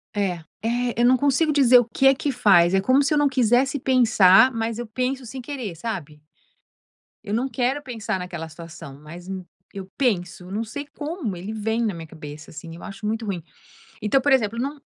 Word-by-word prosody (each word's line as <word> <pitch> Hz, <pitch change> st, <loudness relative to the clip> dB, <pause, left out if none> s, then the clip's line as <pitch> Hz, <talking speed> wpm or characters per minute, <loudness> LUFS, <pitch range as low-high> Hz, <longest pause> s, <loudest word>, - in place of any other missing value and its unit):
É. 190 Hz, -4 st, -1 dB, 0.2 s
É, 240 Hz, +1 st, -1 dB
eu 240 Hz, -, +4 dB
não 255 Hz, +1 st, +6 dB
consigo 285 Hz, +4 st, +2 dB
dizer 255 Hz, -3 st, +6 dB
o 240 Hz, -, +1 dB
que 240 Hz, +4 st, -1 dB
é 270 Hz, -, +7 dB
que 285 Hz, +1 st, -2 dB
faz. 175 Hz, -3 st, +5 dB
É 190 Hz, -, +3 dB
como 260 Hz, +6 st, +4 dB
se 310 Hz, -, +1 dB
eu 300 Hz, -, +2 dB
não 290 Hz, -1 st, +3 dB
quisesse 255 Hz, +2 st, +2 dB
pensar, 245 Hz, -3 st, +5 dB
mas 225 Hz, -1 st, -3 dB
eu 240 Hz, -, -4 dB
penso 255 Hz, +3 st, -2 dB
sem 255 Hz, +3 st, -7 dB
querer, 245 Hz, -, -6 dB
sabe? 155 Hz, -7 st, -6 dB, 1.0 s
Eu 205 Hz, -, -4 dB
não 245 Hz, +4 st, 0 dB
quero 255 Hz, +4 st, -1 dB
pensar 225 Hz, -7 st, -4 dB
naquela 175 Hz, -3 st, -6 dB
situação, 155 Hz, -4 st, -11 dB
mas 170 Hz, +4 st, -11 dB
eu 190 Hz, -2 st, -5 dB, 0.3 s
eu 195 Hz, -1 st, -8 dB
penso, 185 Hz, -7 st, -1 dB
não 210 Hz, +3 st, -2 dB
sei 285 Hz, +6 st, -7 dB
como, 290 Hz, -, -5 dB
ele 200 Hz, +5 st, -6 dB
vem 225 Hz, +2 st, -1 dB
na 210 Hz, -, -1 dB
minha 165 Hz, -1 st, -8 dB
cabeça, 150 Hz, -1 st, -10 dB
assim. 165 Hz, +1 st, -9 dB
Eu 170 Hz, -, -12 dB
acho 205 Hz, 0 st, -8 dB
muito 225 Hz, +1 st, -2 dB
ruim. 185 Hz, -6 st, -4 dB, 0.6 s
Então, 240 Hz, +6 st, +2 dB
por 285 Hz, -, +1 dB
exemplo, 230 Hz, -4 st, +2 dB
não 280 Hz, +4 st, -3 dB
225 Hz, 205 wpm, -23 LUFS, 185-260 Hz, 1.0 s, é